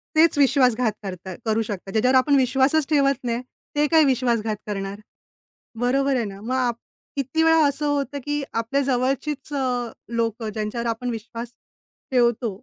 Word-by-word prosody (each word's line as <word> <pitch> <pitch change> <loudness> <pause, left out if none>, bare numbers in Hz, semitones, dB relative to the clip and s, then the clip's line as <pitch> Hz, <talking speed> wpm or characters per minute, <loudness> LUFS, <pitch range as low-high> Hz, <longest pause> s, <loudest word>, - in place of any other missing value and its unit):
तेच 320 -1 +5
विश्वासघात 250 -4 +3
करतात 185 -1 -7
करू 220 0 +1
शकतात. 200 -3 -5
ज्याच्यावर 250 +5 +3
आपण 280 +3 +3
विश्वासच 270 +3 +3
ठेवत 275 -4 +2
नाही, 235 0 -1 0.3
ते 295 0 +3
काय 320 -1 +6
विश्वासघात 235 -5 +1
करणार? 200 0 -4 0.8
बरोबर 270 +3 +2
आहे 240 -3 0
ना? 195 -1 -8
मग 250 +4 -2
आप 245 -2 +1 0.4
किती 280 +3 0
वेळा 325 -1 +5
असं 285 +2 -1
होतं 285 -1 -1
की 295 0 -1
आपल्या 230 +5 0
जवळचीच 270 +3 -1
अ, 250 -3 -1 0.3
लोकं 225 -1 -1
ज्यांच्यावर 220 +2 -3
आपण 230 +2 -2
विश्वास 230 +1 -6 0.6
ठेवतो, 240 -2 +2
250 Hz, 150 wpm, -23 LUFS, 225-275 Hz, 0.8 s, काय